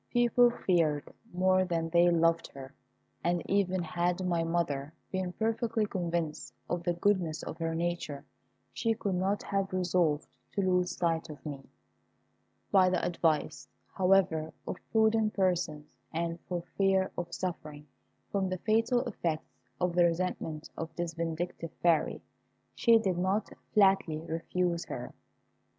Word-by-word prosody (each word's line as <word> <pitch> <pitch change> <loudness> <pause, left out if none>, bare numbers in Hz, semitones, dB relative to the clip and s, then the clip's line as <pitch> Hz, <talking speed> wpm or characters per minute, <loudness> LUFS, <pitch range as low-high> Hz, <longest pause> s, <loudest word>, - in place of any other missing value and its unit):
People 240 0 +5
feared 165 -10 0 0.2
more 185 +1 +3
than 165 -3 -1
they 170 +1 +5
loved 165 0 +3
her; 135 0 -9 0.5
and 175 0 +1
even 185 -2 +1
had 175 +2 -1
my 170 -2 +1
mother 160 -3 -1 0.2
been 185 -1 -2
perfectly 225 0 0
convinced 170 -5 -3
of 175 - -1
the 175 0 0
goodness 175 -4 +1
of 165 - -6
her 165 0 -1
nature, 165 -4 -3 0.5
she 225 -1 0
could 200 -3 -2
not 190 +3 0
have 195 -1 -1
resolved 175 -4 +1 0.3
to 200 - 0
lose 180 -1 +1
sight 165 -2 0
of 150 -2 -10
me. 140 -3 -7 1.0
By 185 -2 +6
the 185 - 0
advice, 160 -3 0 0.3
however, 180 -5 +3 0.2
of - - -3
prudent 220 -1 +3
persons, 175 -6 0 0.2
and 170 +1 -2
for 175 -2 -2 0.2
fear 190 -1 +3
of 175 -1 -4
suffering 155 -5 -5 0.5
from 195 -2 0
the 185 - -2
fatal 225 +5 +2
effects 160 -2 -3 0.3
of 180 -1 +1
the 175 0 +5
resentment 165 -2 -2
of 165 - -4
this 170 -1 -3
vindictive 165 0 -3
Fairy, 170 -3 +2 0.5
she 230 -2 +5
did 190 -5 0
not 190 +4 0 0.2
flatly 195 -6 +4
refuse 170 +1 -1
her. - - -6
175 Hz, 140 wpm, -30 LUFS, 165-190 Hz, 1.0 s, By